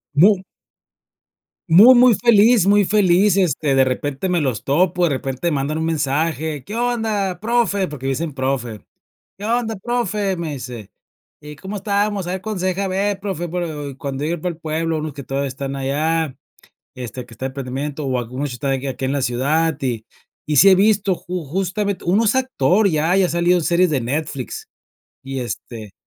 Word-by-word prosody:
Mu 190 +5 +5 1.3
mu 200 +10 +8
muy 245 -2 +6
feliz 230 -2 +5
muy 205 +1 +5
feliz, 200 -1 +3
este, 155 -6 +1
de 135 - +5
repente 135 +5 -2
me 175 -2 +1
los 125 -7 -2
topo, 175 +5 +1
de 170 - +4
repente 135 +4 -2
mandan 145 +1 -1
un 160 - -1
mensaje: 155 -1 -1
"¿Qué 210 - -7
onda, 220 -6 -1
profe?". 215 -4 +1
Porque 140 -3 -8
me - - +1
dicen 155 +2 -3
profe: 130 -5 -3 0.6
"¿Qué 205 - -7
onda, 230 -1 0
profe?" 210 -3 -1
Me 165 -3 -4
dice: 125 -6 -8 0.5
"¿Y 150 0 -10
cómo 190 +5 -7
estamos? 200 -1 -1
A - - -2
ver 185 0 -4
cuándo 215 -3 -4
se 185 - 0
deja 190 +1 -1
ver 195 +1 -1
profe". 190 -4 -4
Pero 160 -5 -4
y 135 - -9
cuando 140 -2 -4
yo 160 - -1
iba 170 -2 -3
para 180 0 -2
al 160 - -26
pueblo, 160 +1 -1
unos 155 -1 -5
que 140 0 -8
todavía 135 +1 -2
están 135 +1 -5
allá, 150 +2 -1 0.6
este, 125 0 -6
que 115 - -14
está 130 +5 -4
de - - -2
emprendimiento, 135 +3 -5
o 130 -1 0
algunos 125 +4 -4
sh - - -6
están 135 +2 -2
aquí 135 +1 -2
aquí 135 0 -4
en 135 - -1
la 140 -2 -1
ciudad, 145 +6 +1
y 120 -5 -2 0.4
y 150 - 0
sí 195 - +8
he - - +8
visto 200 -1 +3
ju 180 -1 -5
justamente 195 +6 -2
1 200 +6 +2
es 225 - +2
actor, 220 -6 +2
ya 160 +1 +1
ya 190 -2 +3
salió 175 +1 +2
en 175 - 0
series 175 +2 +2
de 145 -4 0
Netflix. 135 +1 -4 0.6
Y, 135 0 -5
este, 115 -3 -7
165 Hz, 195 wpm, -20 LUFS, 135-195 Hz, 1.3 s, mu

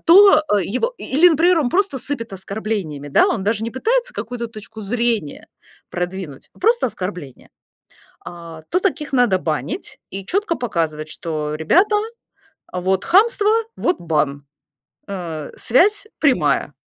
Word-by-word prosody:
То, 355 -2 +7
а, 205 -1 +3
его 255 - -2
и - - -8
и, 265 - -3
или, 355 +2 +8
например, 340 +2 +3
он 255 -6 0
просто 360 -6 +1
сыпет 230 -5 -4
оскорблениями, 195 -7 -4
да. - - +4
Он 210 -5 -1
даже 220 +1 0
не 230 - -3
пытается 485 - 0
какую-то 240 -1 -4
точку 220 0 -11
зрения 225 -6 -1 0.4
продвинуть, 180 -5 -5
просто 470 - +3
оскорбления. 180 - -7 0.8
А, 170 -2 -10
то 360 - +2
таких 315 -7 -2
надо 245 -7 +3
банить 170 - -3
и 195 0 -6
чётко 385 - 0
показывать, 160 -9 -2
что: 150 -1 -4
"Ребята, 370 - +3 0.8
вот 185 +1 0
хамство, 420 +2 +4 0.3
вот 360 - 0
бан". 150 -4 -1 0.6
Э, 165 -6 -6
связь 405 - +3
прямая. 175 - +2
220 Hz, 140 wpm, -20 LUFS, -, 0.8 s, или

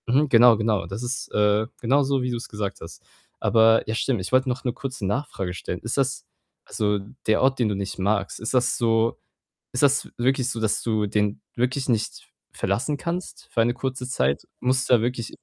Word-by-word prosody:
Mhm, 140 +5 +3
genau, 120 -2 +7
genau. 110 -2 0
Das 100 +5 -6
ist, 125 +1 -3
äh, 105 +1 +3
genauso 135 +2 +2
wie 125 - -1
du's 120 0 -4
gesagt 105 -2 -4
hast. - - -11 0.4
Aber 115 0 +4
ja, 110 - -1
stimmt, 115 -2 0
ich 90 - -5
wollt 130 +1 +3
noch 125 0 -2
'ne 125 - -1
kurze 130 -4 -5
Nachfrage 100 -5 -2
stellen: 90 -1 -5
Ist 115 - -3
das 135 -1 0 0.4
also, 105 -1 0 0.3
der 110 - +3
Ort, 135 0 +2
den 115 -3 +2
du 105 - -1
nicht 100 0 -4
magst, 100 0 0
ist 110 - -3
das 125 0 +2
so 115 -2 +2 0.5
ist 125 - -1
das 140 -1 +3
wirklich 130 +1 +1
so, 115 - -3
dass 110 -2 0
du 110 -2 0
den 105 0 0
wirklich 130 +3 -1
nicht 115 -3 -1 0.2
verlassen 110 +10 -1
kannst 175 +4 -5
für 115 - +2
eine 120 +1 +2
kurze 130 0 -4
Zeit? 70 - 0
Musst 130 0 +1
du - - +5
da 115 - +2
wirklich? 120 0 -3
120 Hz, 200 wpm, -24 LUFS, 105-130 Hz, 0.5 s, genau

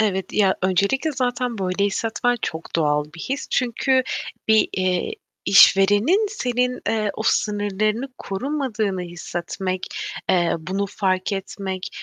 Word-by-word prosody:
Evet 190 -4 0
ya, 195 -3 +3
öncelikle 200 - +1
zaten 250 -3 -1
böyle 190 +1 0
hissetmen 225 +4 0
çok 160 +1 -3
doğal 150 -2 +2
bir 165 - -9
his. 275 +8 -3
Çünkü 260 +2 +2 0.5
bir, 220 -1 +5
eee, 185 -1 0 0.3
işverenin 205 - +6
senin, 250 - -1
eee, 215 -2 +1
o - - -4
sınırlarını 210 +4 0
korumadığını 220 -3 -2
hissetmek, 175 +2 -4 0.4
eee, 175 -2 +2
bunu 190 +5 -2
fark 190 -1 -1
etmek, 190 -1 -4
200 Hz, 120 wpm, -22 LUFS, 185-245 Hz, 0.5 s, işverenin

